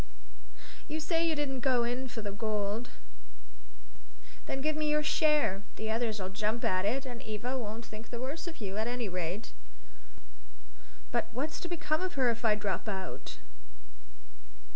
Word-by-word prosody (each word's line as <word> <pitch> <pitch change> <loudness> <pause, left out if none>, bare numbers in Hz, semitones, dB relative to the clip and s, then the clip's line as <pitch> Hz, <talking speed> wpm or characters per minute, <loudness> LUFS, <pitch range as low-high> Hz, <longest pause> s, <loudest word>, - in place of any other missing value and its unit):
"You 310 +1 -1
say 330 +1 +2
you 320 - +3
didn't 280 -3 0
go 250 -2 +4
in 245 +2 0
for 235 -3 -5
the 205 - -2
gold? 210 +1 0 1.6
Then 270 - -1
give 310 +2 +2
up 310 - -1
your 300 0 +3
share; 300 -11 +4
the 220 0 -2
others'll 220 -4 0
jump 215 +4 0
at 185 +1 +3
it; 260 +6 +2
and 245 -2 -5
Eva 220 +4 -2
won't 225 -2 -3
think 215 +1 -9
the 240 - -4
worse 290 +8 -3
of 335 - -5
you, 200 -2 -3
at 220 +1 +1
any 245 -2 0
rate." 180 +3 -2 1.6
"But - - +2
what's 285 +7 -1
to - - -3
become 325 -2 +1
of 370 -1 -1
her 255 -3 +5
if 230 +1 -4
I 215 -2 +6
drop 205 +1 -1
out? 190 - -4
235 Hz, 165 wpm, -32 LUFS, 210-290 Hz, 1.6 s, I